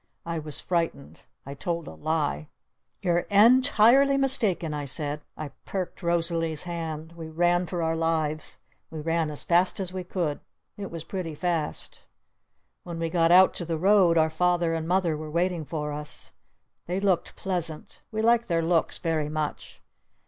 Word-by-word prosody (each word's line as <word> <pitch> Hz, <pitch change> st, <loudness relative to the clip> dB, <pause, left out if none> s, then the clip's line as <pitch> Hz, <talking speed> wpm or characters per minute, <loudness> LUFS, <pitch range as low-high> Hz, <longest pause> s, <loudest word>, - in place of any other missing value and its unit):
I 170 Hz, -1 st, -2 dB
was 150 Hz, -2 st, -3 dB
frightened. 170 Hz, -5 st, -2 dB, 0.2 s
I 140 Hz, -, -6 dB
told 165 Hz, +3 st, -3 dB
a -, -, -7 dB
lie. 155 Hz, -1 st, -1 dB, 0.6 s
"You're 175 Hz, -1 st, +1 dB
en 230 Hz, +6 st, +7 dB
tirely 265 Hz, +4 st, +5 dB
mistaken!" 220 Hz, -, +1 dB
I 145 Hz, -1 st, -3 dB
said. 145 Hz, +1 st, -1 dB, 0.2 s
I 155 Hz, -2 st, -5 dB
perked 190 Hz, -1 st, -4 dB
Rosalee's 165 Hz, -2 st, 0 dB
hand. 165 Hz, -2 st, -5 dB
We 165 Hz, -1 st, -8 dB
ran 175 Hz, +2 st, +2 dB
for 170 Hz, +1 st, -2 dB
our 160 Hz, 0 st, 0 dB
lives. 160 Hz, -2 st, -1 dB, 0.3 s
We 160 Hz, -, -7 dB
ran 165 Hz, 0 st, 0 dB
as 150 Hz, -, -4 dB
fast 175 Hz, +3 st, +2 dB
as 185 Hz, -2 st, -3 dB
we 185 Hz, -1 st, -4 dB
could. 175 Hz, -5 st, -2 dB, 0.4 s
It 200 Hz, -2 st, -6 dB
was 165 Hz, -2 st, -7 dB
pretty 165 Hz, -2 st, -5 dB
fast! 165 Hz, -2 st, -2 dB, 0.8 s
When 170 Hz, -2 st, -7 dB
we 165 Hz, -1 st, -2 dB
got 165 Hz, -1 st, +3 dB
out 185 Hz, +2 st, +7 dB
to -, -, -4 dB
the 165 Hz, -1 st, -2 dB
Road 185 Hz, -1 st, +4 dB
our 160 Hz, 0 st, +3 dB
Father 175 Hz, 0 st, +1 dB
and 165 Hz, 0 st, -2 dB
Mother 175 Hz, -3 st, +2 dB
were 155 Hz, 0 st, -6 dB
waiting 170 Hz, 0 st, 0 dB
for 150 Hz, -1 st, -4 dB
us. 150 Hz, 0 st, -7 dB, 0.6 s
They 180 Hz, +2 st, -1 dB
looked 195 Hz, -3 st, 0 dB
pleasant. 170 Hz, -5 st, -4 dB
We 220 Hz, 0 st, -2 dB
liked 235 Hz, +1 st, +3 dB
their 165 Hz, -2 st, +1 dB
looks 165 Hz, 0 st, +1 dB
very 160 Hz, -3 st, -1 dB
much. 155 Hz, -1 st, -4 dB
170 Hz, 170 wpm, -26 LUFS, 155-180 Hz, 0.8 s, en